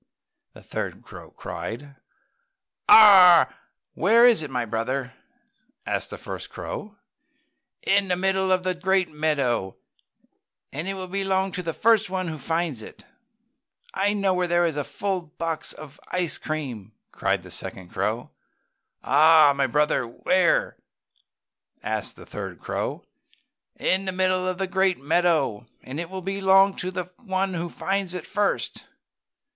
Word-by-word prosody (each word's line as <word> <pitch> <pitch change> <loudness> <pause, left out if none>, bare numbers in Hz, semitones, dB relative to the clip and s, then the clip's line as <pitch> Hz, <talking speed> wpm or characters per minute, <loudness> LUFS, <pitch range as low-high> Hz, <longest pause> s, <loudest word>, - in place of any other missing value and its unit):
the - - -15
third - - -5
crow - - -12
cried. 140 +5 -7 0.9
"Ahhhh! 190 -5 +8 0.4
Where 225 +7 +4
is 235 -8 +5
it, 150 - -5
my 125 -2 -2
brother?" 125 +3 -3 0.7
asked - - -2
the - - -7
first - - -7
crow. 210 0 -7 0.9
"In 200 0 +2
the 180 - +1
middle 190 +1 +1
of 185 -1 +2
the 185 0 0
great 185 +1 +1
meadow, 140 -10 -1 1.0
and 155 +6 -4
it 195 - -2
will 185 -1 -5
belong 190 0 0
to 180 - -3
the 215 +6 +2
one 185 -1 -3
who 155 -1 -6
finds 165 -5 -2
it - - -12
first." - - -30 0.8
"I 200 +2 +1
know 200 -2 +1
where 180 -1 0
there 175 0 +2
is 165 -3 -1
a 185 +6 -3 0.2
box 165 -1 -3
full - - -10
of 145 -1 -14
ice 180 -3 0
cream!" 125 -10 -5 0.2
cried - - -1
the - - -12
second 90 -2 -5
crow. 105 +6 -3 0.7
"Aha! 155 0 +6
My 140 - +1
brother, 150 -3 +1
where?" 390 - +1 1.1
asked - - -3
the - - -13
third - - -7
crow. - - -4 0.7
"In 190 +1 +1
the 190 - -1
middle 185 0 +1
of 185 -1 -2
the 195 - -1
great 190 0 +1
meadow, 150 -7 +1 0.2
and 135 +4 -7
it 170 0 -5
will 190 -1 -7
belong 195 0 +3
to 180 - -3
the 180 -1 -5
one 195 -5 -2
who 170 0 -3
finds 195 0 -2
it 180 - -5
first!" 205 -1 -2
180 Hz, 150 wpm, -24 LUFS, 150-190 Hz, 1.1 s, Ahhhh